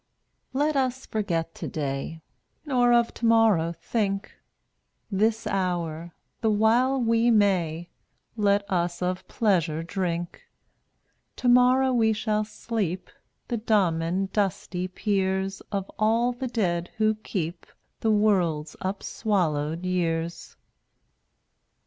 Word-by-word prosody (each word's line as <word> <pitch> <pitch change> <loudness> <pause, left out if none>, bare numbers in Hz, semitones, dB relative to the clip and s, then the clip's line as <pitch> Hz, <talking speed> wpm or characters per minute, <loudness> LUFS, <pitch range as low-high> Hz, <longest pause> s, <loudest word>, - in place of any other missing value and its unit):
194 285 +3 +2
Let 275 -4 +2
us 265 - -15
forget 170 -6 -2
today, 145 +2 -4 0.4
Nor 250 -4 +3
of 235 -1 +3
tomorrow 225 -8 +3
think; 200 -3 -1 0.8
This 220 +3 +1
hour 175 -3 -2
— - - -48
the 225 - +2
while 235 +5 +3
we 230 0 +3
may 180 -7 +2 0.3
— - - -46
Let 200 -2 +2
us 175 -2 -1
of 180 0 -2
pleasure 170 -7 +1
drink. 175 -1 -3 0.9
Tomorrow 250 +1 +4
we 225 -2 +3
shall 215 0 0
sleep 210 -4 -4 0.4
The 240 - -1
dumb 205 -7 +2
and 185 +4 -2
dusty 190 -3 -1
peers 190 0 -1
Of 195 -2 -1
all 225 +3 +3
the 250 +1 -4
dead 180 -8 -1
who 215 0 +3
keep 180 -6 -5 0.3
The 225 - 0
world's 180 -8 +2
upswallowed 175 -5 -1
years. 170 -2 -2
200 Hz, 115 wpm, -26 LUFS, 175-225 Hz, 0.9 s, Tomorrow